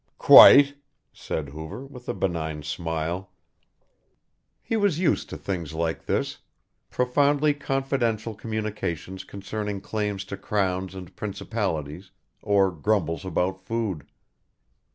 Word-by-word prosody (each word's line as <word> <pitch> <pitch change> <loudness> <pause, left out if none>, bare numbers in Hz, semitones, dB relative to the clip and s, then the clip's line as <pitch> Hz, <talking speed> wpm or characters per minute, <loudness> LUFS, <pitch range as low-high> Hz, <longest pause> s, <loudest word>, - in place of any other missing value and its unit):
"Quite," 140 0 +9 0.4
said 75 -3 -4
Hoover, 80 - -8
with 125 -3 -11
a - - -2
benign 80 -4 -2
smile. 80 +4 -3 1.3
He 225 - -2
was 205 -7 +2
used 175 -1 +1
to - - -6
things 85 -5 -4
like 80 0 -2
this, - - -1 0.5
profoundly 145 +4 +2
confidential 135 -6 -1
communications 105 -5 -4
concerning 100 +1 -5
claims 105 -1 -3
to 100 0 -6
crowns 95 -2 -1
and 90 -2 -10
principalities, 95 -5 -4 0.3
or 100 -2 +3
grumbles 85 -2 -1
about 95 +1 -1
food. 105 -7 -3
100 Hz, 110 wpm, -25 LUFS, 85-115 Hz, 1.3 s, Quite